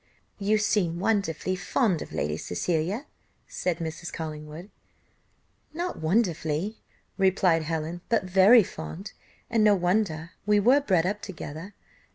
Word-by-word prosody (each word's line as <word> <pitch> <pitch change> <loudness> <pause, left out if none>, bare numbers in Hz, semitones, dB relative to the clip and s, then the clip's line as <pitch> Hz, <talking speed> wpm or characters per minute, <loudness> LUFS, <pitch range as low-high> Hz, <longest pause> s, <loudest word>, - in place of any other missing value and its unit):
"You 210 +2 +2
seem 205 -5 +1
wonderfully 185 -2 0
fond 195 - 0
of - - -8
Lady 75 +1 -1
Cecilia," 170 - -2 0.4
said 180 -2 -2
Mrs. 165 0 -5
Collingwood. 155 +3 -7 1.0
"Not 350 +2 -3
wonderfully," 170 +1 0 0.4
replied 190 -3 +3
Helen, 160 +2 -3
"but 230 - +2
very 190 +5 +6
fond, 170 +3 -8 0.4
and 225 -2 +2
no 210 -1 +6
wonder, 175 -3 0
we 210 0 +3
were 255 +8 +5
bred 185 -11 +2
up 205 +3 -2
together. 175 +1 -8
185 Hz, 125 wpm, -27 LUFS, 160-210 Hz, 1.0 s, very